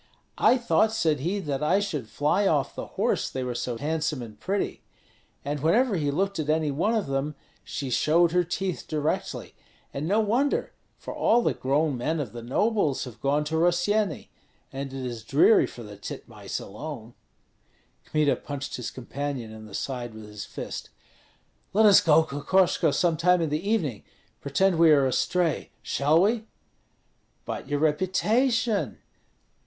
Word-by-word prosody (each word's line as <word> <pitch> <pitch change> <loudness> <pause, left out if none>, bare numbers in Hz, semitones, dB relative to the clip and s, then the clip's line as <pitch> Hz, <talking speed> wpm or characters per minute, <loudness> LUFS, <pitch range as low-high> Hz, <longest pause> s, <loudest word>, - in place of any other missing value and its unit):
'I 255 - +5
thought,' 235 -2 +2
said 160 -9 +1
he, 175 +9 -1
'that 145 -8 -3
I 175 +6 +3
should 150 - -3
fly 180 +8 +1
off 145 -6 +1
the - - -6
horse, - - +1
they 130 - -4
were 125 -1 -3
so 120 0 -3
handsome 155 -1 -2
and 110 -2 -11
pretty.' 200 +1 -2 0.6
And 145 +1 -2
whenever 210 - +3
he 150 -4 0
looked 195 +5 -1
at 155 -1 -2
any 155 -1 +2
one 190 +11 +1
of 215 - 0
them 135 +2 -2 0.3
she 135 -3 -5
showed 165 +7 +3
her 180 +1 +3
teeth 180 +2 -3
directly. 155 0 -2 0.4
And 145 +3 -3
no 205 +5 +3
wonder! 235 +7 +1 0.2
for - - -7
all 235 +2 +3
the - - +2
grown 140 0 0
men 155 +6 -1
of 140 - -4
the 120 - -7
nobles 155 - +1
have 125 -4 -10
gone 145 +2 +1
to 155 +2 -2
Rossyeni, 175 +5 +1 0.4
and 135 0 -5
it 135 -1 -5
is 120 -3 -5
dreary 145 - +5
for 120 - -10
the 105 -1 -10
titmice 100 - -6
alone." 120 +1 -8 0.9
Kmita 150 -2 +1
punched 140 -1 -6
his 125 - -4
companion 130 -2 -5
in 110 0 -10
the 100 - -9
side 120 -4 -4
with 110 -1 -9
his 105 -1 -7
fist. - - -7 0.8
"Let 215 +3 +5
us 205 -2 +8
go, 160 0 +5
Kokoshko, 165 +3 +2
some 165 +2 +1
time 180 +2 +4
in 160 -3 -1
the 160 +7 -2
evening, 155 - 0 0.4
pretend 170 +5 +1
we 165 -1 +7
are 145 -3 +5
astray, 165 +5 0
shall 150 +4 +2
we?" 220 +2 +1 1.0
"But - - -5
your 145 - 0
reputation?" 215 - +1
155 Hz, 165 wpm, -26 LUFS, 135-190 Hz, 1.0 s, us